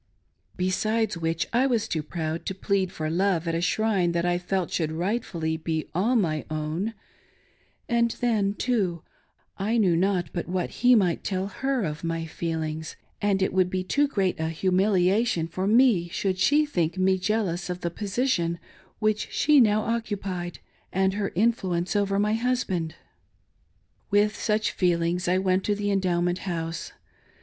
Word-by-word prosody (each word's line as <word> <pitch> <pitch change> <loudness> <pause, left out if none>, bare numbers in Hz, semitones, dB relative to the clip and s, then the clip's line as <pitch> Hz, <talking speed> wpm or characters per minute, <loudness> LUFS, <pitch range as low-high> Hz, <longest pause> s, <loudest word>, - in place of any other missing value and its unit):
Resides 210 +4 0
which, 165 0 -1
I 255 +3 +3
was 235 -5 0
too 160 - -1
proud 160 +1 -4
to 190 - -2
plead 195 -1 0
for 155 - -4
love 175 0 +1
at 165 - 0
a 165 - 0
shrine 190 -2 +1
that 170 0 0
I 175 0 +1
felt 180 0 -2
should 160 -2 -1
rightfully 170 -3 -2
be 160 -1 -3
all 215 +9 +1
my 160 -9 +1
own, 155 +8 -3 0.9
And 235 0 +2
then, 210 -4 +1
too, 195 -11 0 0.6
I 215 +5 +1
knew 190 -6 +3
not 180 -2 +1
but 175 - -3
what 180 -1 -1
he 250 +1 +7
might 180 -6 +2
tell 190 0 -1
/lef 265 -5 +1
of 150 +1 -6
my 165 0 -2
feelings; 160 -1 -4 0.3
and 200 -2 +2
it - - 0
would 185 -1 +3
be 185 0 -2
too 285 +10 +2
great 195 - 0
a 160 0 -1
humiliation 185 +2 +2
for 185 +3 -3
me 220 -6 +4
should 185 +1 -1
she 295 +8 +4
think 175 - -1
me 190 0 +2
jealous 190 -3 -1
of 180 0 -4
the 170 - -2
position 200 -4 -1 0.4
which 215 -1 0
she 300 -1 +4
now 215 -3 +4
occupijed, 200 -6 -3 0.4
and 190 +1 +1
her 200 0 -1
influ 195 -3 +1
ence 175 +4 -2
over 200 -1 +1
my 210 +1 +2
husband. 220 -9 -1 1.1
With 210 0 +3
such 215 0 0
feelings 175 0 0
I 180 +1 +3
went 185 0 +1
to 205 - +1
the 205 0 -1
Endowment 180 -2 +1
House. 165 -2 -4
185 Hz, 165 wpm, -26 LUFS, 170-210 Hz, 1.1 s, he